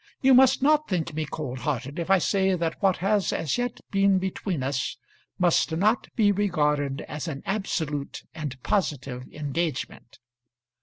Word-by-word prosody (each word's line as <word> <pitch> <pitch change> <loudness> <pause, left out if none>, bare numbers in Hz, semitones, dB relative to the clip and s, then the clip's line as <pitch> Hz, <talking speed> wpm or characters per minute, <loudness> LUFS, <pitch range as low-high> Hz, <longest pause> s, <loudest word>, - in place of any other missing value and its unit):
You 265 0 +5
must 260 +1 +5
not 305 +1 +4
think 165 -4 -1
me 155 0 -2
cold 130 -4 -5
hearted 140 +3 -3
if 170 - -3
I 195 - +6
say 190 +1 +2
that 165 -2 -3
what 190 -2 +3
has 205 -1 +2
as 160 - -1
yet 245 -1 -3
been 195 -1 +4
between 185 -4 -2
us 130 -1 -2 0.4
must 175 -2 +2
not 210 +8 +2
be 210 -3 +4
regarded 150 -8 0
as 150 +3 -6
an 140 -4 -5
absolute 160 -8 -3
and 150 -5 -5
positive 135 -9 -1
engagement. 150 -4 -4
165 Hz, 155 wpm, -26 LUFS, 145-195 Hz, 0.4 s, I